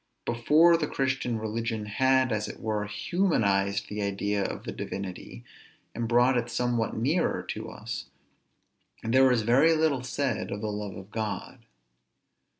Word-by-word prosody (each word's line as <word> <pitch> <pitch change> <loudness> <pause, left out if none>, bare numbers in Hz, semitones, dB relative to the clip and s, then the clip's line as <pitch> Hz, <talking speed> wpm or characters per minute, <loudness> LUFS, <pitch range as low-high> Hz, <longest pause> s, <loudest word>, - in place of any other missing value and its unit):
Before 150 +9 +5
the 155 -2 -1
Christian 135 -3 -1
religion 110 0 -3
had, 130 +4 +2
as 105 -1 -1
it - - -8
were, 105 -1 -2
humanized 105 - +1
the 105 0 -4
idea 100 0 -1
of - - -4
the - - -5
Divinity, 95 -2 -6 0.5
and 115 0 -2
brought 120 +2 +4
it 120 0 0
somewhat 120 -2 0
nearer 145 +10 +1
to - - -4
us, - - -6 1.0
there 130 +4 +4
was 120 -3 +2
very 135 +9 +5
little 155 -5 +2
said 130 -1 -2
of 105 - -4
the 110 -1 -2
love 105 -1 -5
of 95 +2 -11
God. 110 -1 -5
115 Hz, 150 wpm, -28 LUFS, 105-130 Hz, 1.0 s, Before